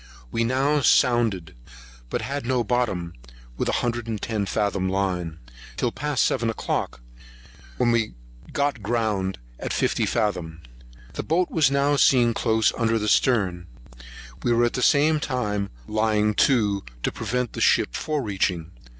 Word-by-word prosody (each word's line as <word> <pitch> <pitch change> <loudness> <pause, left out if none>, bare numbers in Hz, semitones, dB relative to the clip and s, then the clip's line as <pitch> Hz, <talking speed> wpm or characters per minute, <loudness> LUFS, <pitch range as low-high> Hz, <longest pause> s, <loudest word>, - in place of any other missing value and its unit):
We 115 - 0
now 135 +5 +2
sounded, 115 -10 +2 0.6
but - - -2
had 140 +1 -3
no 125 0 0
bottom 105 -8 -1 0.4
with - - -1
a - - 0
hundred 120 -1 -2
and 110 -2 -3
ten 105 -3 -2
fathom 100 -2 0
line, 90 -4 -2 0.4
till - - 0
past 145 -2 0
seven 115 0 0
o'clock, 85 - -3 0.8
when 120 -1 +2
we 115 - 0 0.4
got 140 -5 -1
ground 105 -3 -1 0.2
in - - -4
fifty - - 0
fathom. 90 -7 -2 0.5
The - - -3
boat 175 +3 0
was 155 -5 +3
now 140 +1 +2
seen 120 -4 +4
close 110 -1 +2
under 115 -1 +1
the 105 -1 -2
stern; 95 -8 +2 0.7
we 120 - 0
were 120 0 +4
at 120 - -1
the 125 - -2
same 150 +4 +4
time 105 -8 -2 0.2
lying 105 -1 +1 0.2
to, 105 -7 +1 0.2
to - - 0
prevent 120 +2 -3
the - - -5
ship - - +3
fore 150 -3 -2
reaching. 95 -5 -1
115 Hz, 150 wpm, -24 LUFS, 100-125 Hz, 0.8 s, seen